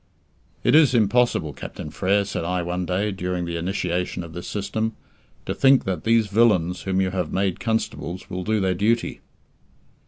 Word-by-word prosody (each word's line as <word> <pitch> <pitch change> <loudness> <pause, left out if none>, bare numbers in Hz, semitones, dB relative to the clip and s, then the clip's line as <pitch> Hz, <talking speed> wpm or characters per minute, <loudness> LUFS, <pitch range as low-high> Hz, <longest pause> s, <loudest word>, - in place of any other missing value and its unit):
"It - - +3
is 150 -4 +6
impossible, 115 - +2
Captain 75 - -8
Frere," 100 +4 +1
said 100 - -3
I 90 +1 -1
one 90 +1 -3
day, 100 +3 0
during 90 -2 -3
the 85 0 -4
initiation 90 0 -2
of 85 -1 -10
this 90 0 -7
system, 110 +2 -2 0.5
"to - - -2
think 135 -1 +5
that 95 -2 -3
these 115 0 +4
villains 100 -5 +2
whom 95 -1 -1
you 95 -1 0
have 90 -4 -2
made 95 -1 0
constables 95 -4 -3
will 90 0 -4
do 110 +2 +1
their 95 -1 +1
duty." 110 +6 0
95 Hz, 175 wpm, -23 LUFS, 90-110 Hz, 0.5 s, is